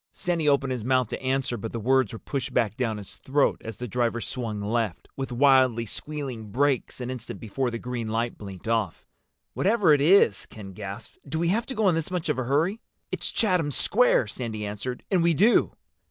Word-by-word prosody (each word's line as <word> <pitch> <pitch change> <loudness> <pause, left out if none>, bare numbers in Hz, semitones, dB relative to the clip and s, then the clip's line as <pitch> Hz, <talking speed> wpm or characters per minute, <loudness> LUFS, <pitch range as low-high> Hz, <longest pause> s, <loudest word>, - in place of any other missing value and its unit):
Sandy 170 -4 0
opened 135 -2 +2
his 125 -4 -3
mouth 130 -1 +2
to - - -5
answer, 130 -1 0
but 110 +1 -5
the 115 - -4
words 130 0 +2
were 115 - -6
pushed 135 +2 -4
back 110 -4 +2
down 115 -4 -1
his 100 -2 -10
throat 140 +1 +1
as 110 -2 -7
the 125 - -5
driver 120 0 0
swung 115 -3 -4
left, 105 -2 -2
with 135 -1 -4
wildly 130 -2 +4
squealing 130 -3 -6
brakes, 135 +3 0
an 125 0 -4
instant 125 -2 -7
before 125 +3 -2
the 115 - -4
green 120 -1 -4
light 115 +2 -1
blinked 100 -1 -9
off. 110 -7 -1 0.5
"Wherever 200 -6 +3
it 145 - +3
is," 155 - +4
Ken 100 -3 -10
gasped, 100 +2 -8
"do 160 - -2
we 170 +1 +1
have 225 +5 0
to 265 - -5
go 215 -2 +2
in 180 - +4
this 165 -1 -2
much 180 -3 -2
of 150 - 0
a 130 - -1
hurry?" 160 - +1 0.3
"It's - - -2
Chatham 180 -9 +1
Square," 205 - +3
Sandy 110 -1 -5
answered. 105 +5 -5
"And 185 -3 +3
we 170 -1 +3
do." 215 +10 +4
125 Hz, 210 wpm, -26 LUFS, 115-150 Hz, 0.5 s, wildly